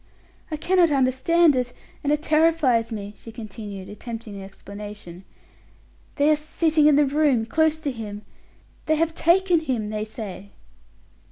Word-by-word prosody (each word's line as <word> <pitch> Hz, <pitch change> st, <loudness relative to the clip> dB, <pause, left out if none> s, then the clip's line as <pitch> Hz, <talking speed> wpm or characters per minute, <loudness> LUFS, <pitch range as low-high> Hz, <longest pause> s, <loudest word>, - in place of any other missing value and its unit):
"I 310 Hz, -, -3 dB
cannot 355 Hz, +1 st, +3 dB
understand 280 Hz, +4 st, +3 dB
it, 250 Hz, -1 st, -1 dB, 0.3 s
and 290 Hz, -, +1 dB
it 300 Hz, 0 st, 0 dB
terrifies 305 Hz, -8 st, +3 dB
me," 205 Hz, -2 st, -6 dB
she 225 Hz, -, -11 dB
continued, 210 Hz, -3 st, -8 dB
attempting 225 Hz, 0 st, -8 dB
an 200 Hz, -, -7 dB
explanation. 195 Hz, -2 st, -10 dB, 0.9 s
"They 290 Hz, +1 st, +3 dB
are -, -, +5 dB
sitting 310 Hz, 0 st, +2 dB
in 300 Hz, -, +6 dB
the 295 Hz, 0 st, +5 dB
room, 280 Hz, -5 st, +2 dB
close 315 Hz, +6 st, +1 dB
to 290 Hz, -3 st, -2 dB
him: 210 Hz, -3 st, -7 dB, 0.6 s
they 315 Hz, -, +3 dB
have 325 Hz, +1 st, 0 dB
taken 350 Hz, +1 st, +3 dB
him, 245 Hz, -9 st, -2 dB
they 215 Hz, 0 st, -3 dB
say." 200 Hz, -3 st, -8 dB
260 Hz, 150 wpm, -24 LUFS, 210-310 Hz, 0.9 s, in